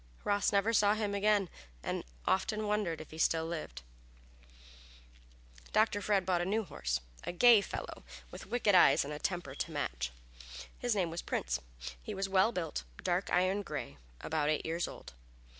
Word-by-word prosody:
Ross 205 Hz, 0 st, +2 dB
never 205 Hz, +3 st, +2 dB
saw 205 Hz, -1 st, +4 dB
him 210 Hz, -2 st, -1 dB
again, 200 Hz, -1 st, +3 dB, 0.4 s
and -, -, -2 dB, 0.2 s
often 215 Hz, +3 st, +1 dB
wondered 205 Hz, -6 st, 0 dB
if 155 Hz, -, -10 dB
he 160 Hz, -, -9 dB
still 160 Hz, 0 st, +2 dB
lived. 155 Hz, -, -5 dB, 1.9 s
Dr. 215 Hz, -1 st, +3 dB
Fred 200 Hz, -1 st, +2 dB
soon -, -, -15 dB
bought 180 Hz, -2 st, +2 dB
a -, -, -1 dB
new 215 Hz, +4 st, +1 dB
horse -, -, -2 dB, 0.2 s
a -, -, -3 dB
gay 230 Hz, +4 st, +7 dB
fellow, -, -, -6 dB, 0.3 s
with -, -, -9 dB
wicked 220 Hz, -2 st, +2 dB
eyes 140 Hz, -7 st, +6 dB
and 150 Hz, -, -5 dB
a 150 Hz, -, -5 dB
temper 175 Hz, -5 st, -2 dB
to 160 Hz, -, -4 dB
match. -, -, -2 dB, 0.6 s
His 245 Hz, -3 st, -1 dB
name 180 Hz, -5 st, 0 dB
was 170 Hz, -, -4 dB
Prince. 65 Hz, 0 st, -2 dB, 0.4 s
He -, -, -6 dB
was 195 Hz, -, -1 dB
a 195 Hz, -, -7 dB
well 195 Hz, +4 st, +4 dB
built, 165 Hz, -, -3 dB, 0.2 s
dark 180 Hz, +2 st, 0 dB
iron 185 Hz, +3 st, +2 dB
gray 145 Hz, -, -6 dB, 0.2 s
about 155 Hz, -2 st, 0 dB
eight 155 Hz, -, 0 dB
years 165 Hz, +2 st, -1 dB
old. -, -, -10 dB
185 Hz, 175 wpm, -33 LUFS, 155-205 Hz, 1.9 s, gay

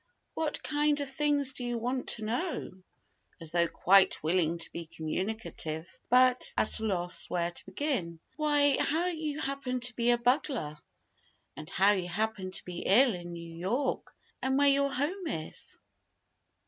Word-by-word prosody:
"What 315 Hz, -2 st, -3 dB
kind 295 Hz, 0 st, +1 dB
of 280 Hz, -2 st, -4 dB
things 285 Hz, -1 st, +2 dB
do 250 Hz, -, -6 dB
you 240 Hz, -1 st, -2 dB
want 250 Hz, +3 st, -2 dB
to 220 Hz, -, -1 dB
know?" 310 Hz, +11 st, -2 dB, 0.7 s
as 165 Hz, -2 st, -2 dB
though 170 Hz, 0 st, +3 dB
quite 190 Hz, +1 st, +4 dB
willing 165 Hz, 0 st, +1 dB
to 165 Hz, -, -4 dB
be 170 Hz, -1 st, -6 dB
communicative, 165 Hz, -1 st, -4 dB
but 255 Hz, 0 st, +4 dB
at -, -, +2 dB
a 220 Hz, -, -3 dB
loss 180 Hz, -4 st, -1 dB
where 175 Hz, -1 st, -1 dB
to -, -, -7 dB
begin. 190 Hz, -, -2 dB, 0.2 s
"Why, 290 Hz, -2 st, +3 dB
how 325 Hz, +4 st, +1 dB
you 315 Hz, -4 st, -2 dB
happened 270 Hz, -4 st, -3 dB
to 240 Hz, 0 st, +1 dB
be 235 Hz, 0 st, +1 dB
a 240 Hz, -, +5 dB
bugler, 240 Hz, -, 0 dB, 0.8 s
and 155 Hz, +1 st, -9 dB
how 195 Hz, +3 st, +4 dB
you 185 Hz, -3 st, -1 dB
happened 195 Hz, -1 st, -2 dB
to -, -, -1 dB
be 180 Hz, -1 st, -6 dB
ill 240 Hz, +4 st, +4 dB
in 175 Hz, -1 st, -7 dB
New 170 Hz, -1 st, -8 dB
York, 225 Hz, +11 st, -2 dB, 0.3 s
and 265 Hz, 0 st, +1 dB
where 285 Hz, 0 st, +6 dB
your 280 Hz, 0 st, +3 dB
home 325 Hz, +8 st, -2 dB
is?" 160 Hz, -, -4 dB
235 Hz, 165 wpm, -30 LUFS, 175-280 Hz, 0.8 s, where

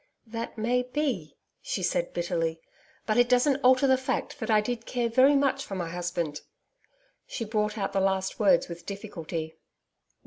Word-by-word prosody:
'That 230 Hz, +1 st, -6 dB
may 240 Hz, +3 st, +1 dB
be,' 250 Hz, -, -3 dB, 0.2 s
she -, -, -3 dB
said -, -, 0 dB
bitterly. 165 Hz, -2 st, -1 dB, 0.5 s
'But 215 Hz, 0 st, +1 dB
it 245 Hz, 0 st, +4 dB
doesn't 255 Hz, +2 st, +4 dB
alter 255 Hz, +2 st, +5 dB
the 260 Hz, -1 st, +4 dB
fact 260 Hz, +2 st, -3 dB
that 220 Hz, -, -4 dB
I 215 Hz, -1 st, +5 dB
did 230 Hz, +2 st, -3 dB
care 240 Hz, -2 st, 0 dB
very 260 Hz, +5 st, +5 dB
much 275 Hz, 0 st, +2 dB
for 200 Hz, -, -6 dB
my 175 Hz, -3 st, -3 dB
husband.' 175 Hz, -3 st, -3 dB, 0.9 s
She 230 Hz, -, -4 dB
brought 210 Hz, 0 st, -1 dB
out 195 Hz, -2 st, -2 dB
the 195 Hz, -, +2 dB
last 190 Hz, 0 st, 0 dB
words 190 Hz, -5 st, +4 dB
with 170 Hz, -1 st, -9 dB
difficulty. 165 Hz, -6 st, -5 dB
215 Hz, 170 wpm, -28 LUFS, 175-250 Hz, 0.9 s, alter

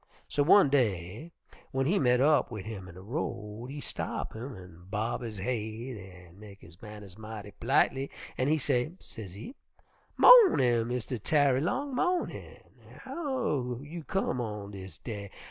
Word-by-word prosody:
So 145 Hz, -, 0 dB
one 165 Hz, +2 st, +6 dB
day 110 Hz, -, 0 dB, 0.4 s
w'en 135 Hz, 0 st, 0 dB
he 190 Hz, +7 st, +2 dB
met 125 Hz, -3 st, +3 dB
up 145 Hz, -2 st, +4 dB
wid 105 Hz, -5 st, -6 dB
him 100 Hz, -4 st, -7 dB
in 85 Hz, -, -12 dB
de 95 Hz, -, -11 dB
road 110 Hz, -, -4 dB
he 145 Hz, +2 st, -6 dB
stop -, -, -4 dB
him 120 Hz, +3 st, -7 dB
an' 90 Hz, -2 st, -13 dB
bob 110 Hz, +4 st, -2 dB
his 115 Hz, -3 st, -6 dB
haid 115 Hz, +3 st, -3 dB
an' 90 Hz, -2 st, -13 dB
mek 100 Hz, -2 st, -13 dB
his 85 Hz, +3 st, -16 dB
manners 105 Hz, -2 st, -11 dB
mighty 105 Hz, -2 st, -8 dB
p'litely, 135 Hz, +2 st, +2 dB, 0.3 s
an' 130 Hz, -, 0 dB
he 155 Hz, +2 st, +3 dB
say, 140 Hz, +1 st, 0 dB
sezee, 105 Hz, -, -9 dB, 0.6 s
'Mawnin', 130 Hz, -, +7 dB
Mistah 125 Hz, 0 st, -3 dB
Tarry 140 Hz, +2 st, +3 dB
long, 260 Hz, -, -1 dB
mawnin'. 360 Hz, +7 st, -2 dB, 0.4 s
How 235 Hz, -, -2 dB
you 160 Hz, +3 st, -7 dB
come 145 Hz, -8 st, -1 dB
on 105 Hz, -3 st, -5 dB
dis 95 Hz, -1 st, -9 dB
day? 105 Hz, -4 st, -6 dB
120 Hz, 155 wpm, -30 LUFS, 105-145 Hz, 0.6 s, Mawnin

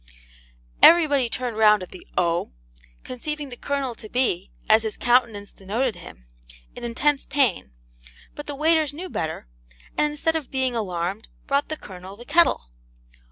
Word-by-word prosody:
Everybody 290 Hz, -7 st, +6 dB
turned 240 Hz, -1 st, -4 dB
round 210 Hz, -3 st, +5 dB
at 180 Hz, -, -11 dB
the 185 Hz, -, -12 dB
'O,' 170 Hz, -, 0 dB, 0.5 s
conceiving 290 Hz, +3 st, -5 dB
the 245 Hz, -, -8 dB
Colonel 275 Hz, 0 st, -2 dB
to 215 Hz, -1 st, -12 dB
be, 220 Hz, -8 st, 0 dB, 0.2 s
as 220 Hz, +1 st, +6 dB
his 220 Hz, -1 st, -4 dB
countenance 235 Hz, -5 st, +1 dB
denoted 220 Hz, +5 st, -2 dB
him, -, -, -12 dB, 0.5 s
in -, -, -9 dB
intense 270 Hz, +5 st, 0 dB
pain; 255 Hz, -, 0 dB, 0.6 s
but 295 Hz, -, -9 dB
the 290 Hz, -, -4 dB
waiters 310 Hz, 0 st, +2 dB
knew 360 Hz, +5 st, -7 dB
better, 160 Hz, -, -4 dB, 0.5 s
and 300 Hz, -, +2 dB
instead 320 Hz, +2 st, 0 dB
of 310 Hz, -5 st, -3 dB
being 260 Hz, -2 st, 0 dB
alarmed, 190 Hz, -1 st, -3 dB, 0.2 s
brought 280 Hz, +1 st, 0 dB
the 310 Hz, -, -3 dB
Colonel 185 Hz, -3 st, -10 dB
the 240 Hz, +3 st, -12 dB
kettle. 295 Hz, -, +3 dB
245 Hz, 155 wpm, -24 LUFS, 205-290 Hz, 0.6 s, Everybody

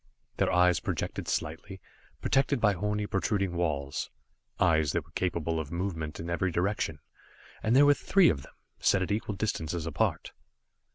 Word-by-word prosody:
Their -, -, +2 dB
eyes 90 Hz, 0 st, +4 dB
projected -, -, -3 dB
slightly, 90 Hz, +5 st, -3 dB, 0.4 s
protected 135 Hz, 0 st, +2 dB
by 105 Hz, -3 st, +4 dB
horny 105 Hz, +2 st, -1 dB
protruding 100 Hz, -2 st, 0 dB
walls 75 Hz, -5 st, -2 dB, 0.5 s
eyes 80 Hz, -3 st, +3 dB
that -, -, -1 dB
were -, -, -22 dB
capable 85 Hz, -3 st, -1 dB
of 75 Hz, -2 st, -5 dB
movement 85 Hz, -4 st, -3 dB
in 85 Hz, -, -5 dB
every 85 Hz, +2 st, 0 dB
direction 90 Hz, -3 st, -1 dB, 0.6 s
and 110 Hz, +3 st, +2 dB
there 140 Hz, +2 st, +7 dB
were 145 Hz, -, +7 dB
three 190 Hz, +5 st, +4 dB
of 70 Hz, -, -1 dB
them, -, -, -16 dB, 0.2 s
set 95 Hz, -, +3 dB
at 95 Hz, -, -3 dB
equal 105 Hz, 0 st, -1 dB
distances 85 Hz, -6 st, -2 dB
apart. 80 Hz, -3 st, -1 dB
90 Hz, 160 wpm, -29 LUFS, 80-105 Hz, 0.6 s, there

